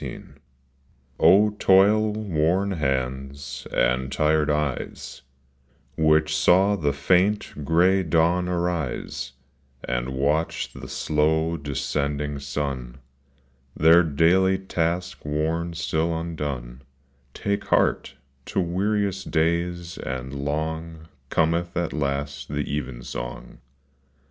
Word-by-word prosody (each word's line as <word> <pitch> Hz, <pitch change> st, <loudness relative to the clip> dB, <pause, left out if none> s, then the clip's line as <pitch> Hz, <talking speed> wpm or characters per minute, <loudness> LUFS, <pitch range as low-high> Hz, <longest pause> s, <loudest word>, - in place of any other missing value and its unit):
EVEN -, -, -8 dB, 0.8 s
SONG, 105 Hz, +2 st, +5 dB
TOIL 105 Hz, +3 st, +4 dB
worn 95 Hz, -1 st, 0 dB
hands, 70 Hz, -3 st, -3 dB
and 65 Hz, +2 st, +1 dB
tired 75 Hz, +2 st, +2 dB
eyes, 75 Hz, -3 st, -3 dB, 0.7 s
Which 75 Hz, -1 st, +3 dB
saw 95 Hz, +6 st, +4 dB
the 75 Hz, -7 st, 0 dB
faint 90 Hz, +3 st, +1 dB
gray 90 Hz, +6 st, +3 dB
dawn 85 Hz, +2 st, +2 dB
arise, 85 Hz, -6 st, -2 dB, 0.5 s
And -, -, -2 dB
watch 70 Hz, +5 st, -1 dB
the -, -, -9 dB
slow 80 Hz, +2 st, +1 dB
descending 70 Hz, 0 st, -2 dB
sun, 70 Hz, -3 st, -4 dB, 0.8 s
Their 80 Hz, +3 st, +7 dB
daily 90 Hz, +5 st, +3 dB
task 90 Hz, -2 st, -2 dB
work 80 Hz, +3 st, -2 dB
still 80 Hz, 0 st, -1 dB
undone, 70 Hz, -7 st, -5 dB, 0.3 s
— 65 Hz, -1 st, -38 dB
Take 100 Hz, 0 st, -2 dB
heart, -, -, +1 dB, 0.3 s
to -, -, -1 dB
weariest 95 Hz, +2 st, -1 dB
days 85 Hz, +1 st, -1 dB
and 65 Hz, 0 st, -5 dB
long 80 Hz, +3 st, -4 dB, 0.2 s
Cometh 85 Hz, +2 st, 0 dB
at 85 Hz, -1 st, -1 dB
last 70 Hz, -1 st, -3 dB
the 75 Hz, 0 st, -2 dB
even 65 Hz, -4 st, -4 dB
song. -, -, -7 dB
80 Hz, 100 wpm, -24 LUFS, 70-85 Hz, 0.8 s, Their